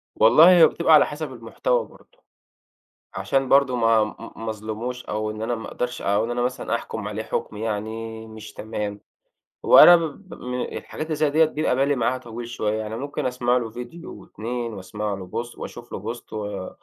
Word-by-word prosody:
والله، 155 +10 +7
هي 175 -3 +8
بتبقي 165 -1 +2
على 150 - +8
حسب 150 -3 -6
المحتوى - - -1
برضه، - - -22 0.9
عشان 135 -1 0
برضه 135 -2 +4
ما 115 -2 +4
م 105 - -5 0.2
ما 115 0 -5
أظلِمهوش 110 +4 -5
أو 110 0 -2
إن 110 - -7
أنا 120 +2 -1
ما 110 - -7
أقدَرش، 125 0 -4
أو 100 +2 +1
إن 120 - -4
أنا 120 - -1
مثلًا 125 -1 -1
أحكُم 110 -2 -5
عليه 110 +1 -4
حُكم 105 - -4
يعني 110 +1 -4
مش 110 -1 -11
تمام، 105 -2 -5 0.6
هو - - +7
أنا 175 - +11
ب 170 +3 -4
ب - - -9
من 125 0 -4 0.2
الحاجات 155 +1 -6
زيّ 150 -1 +2
ديّة 155 +2 +4
بيبقى 155 -4 0
بالي 140 +2 +2
معاها 125 +1 0
طويل 120 -1 -8
شوية، 110 -2 -2
يعني 110 0 -4
ممكن 140 +3 -4
أسمَع 125 -1 +1
له 115 -2 -3
فيديو 125 - -9
و2 115 +3 -5
وأسمَع 105 +2 -4
له 95 -2 -7
Post 115 +5 -5
وأشوف 120 0 -9
له 110 +4 -4
Post 120 - -14
و 105 -3 -4
115 Hz, 195 wpm, -23 LUFS, 110-135 Hz, 0.9 s, أنا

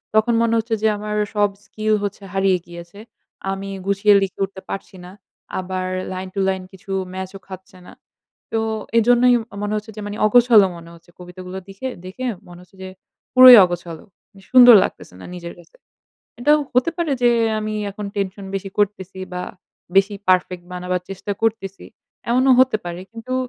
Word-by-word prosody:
তখন 220 +2 +3
মনে 230 0 +1
হচ্ছে 225 0 -1
যে 220 - +3
আমার 210 0 -5 0.2
সব 205 0 +3 0.2
স্কিল 215 +1 -2
হচ্ছে 200 0 -5
হারিয়ে 195 -1 +2
গিয়েছে। 170 +3 -12 0.5
আমি 195 0 -5 0.2
গুছিয়ে 200 +1 +3
লিখে 195 -1 -4
উঠতে 190 0 -12
পারছি 195 0 -7
না। 180 - -11 0.5
আবার 185 0 -4 0.3
লাইন 185 0 -5
টু - - -2
লাইন 190 -1 -3
কিছু 195 +1 -12 0.2
ম্যাচ 190 0 -5
ও - - -18
খাচ্ছে 190 -1 -12
না। - - -13 0.6
তো 225 - 0 0.4
এইজন্যই 245 +2 +4
ম - - -8 0.2
মনে 205 0 -2
হচ্ছে 215 +1 -7
যে - - -5
মানে 205 +1 -6
অগোছল 235 0 +6 0.2
মনে 170 0 -13
হচ্ছে 170 +1 -21
কবিতাগুলো 180 +1 -9
দিখে 195 +7 -6 0.2
দেখে 200 +8 -7 0.2
মনে 175 0 -13
হচ্ছে 180 +2 -24
যে 190 - -7 0.4
পুরোই 255 -1 +11
অগোছাল। 175 -2 -6 0.5
সুন্দর 245 -2 +9
লাগতেছে - - -7
না - - -10
নিজের 170 -1 -8
কাছে। 175 - -20 0.7
এটাও 295 +4 +4 0.2
হতে 250 +6 +2
পারে 335 -4 -1
যে 240 - +5 0.3
আমি 215 0 -4 0.2
এখন 205 +1 -7
টেনশন 195 0 -3
বেশি 195 0 -4
করতেছি 195 -2 -1 0.2
বা 180 - -3 0.5
বেশি 195 +1 +4
পারফেক্ট 180 -1 +1
বানাবার 180 0 -3
চেষ্টা 195 +1 -5
করতেছি, 200 -4 -2 0.5
এমনও 255 +2 +4
হতে 260 -3 +3
পারে। 175 0 -6
কিন্তু 230 +3 -6
195 Hz, 170 wpm, -20 LUFS, 185-225 Hz, 0.7 s, পুরোই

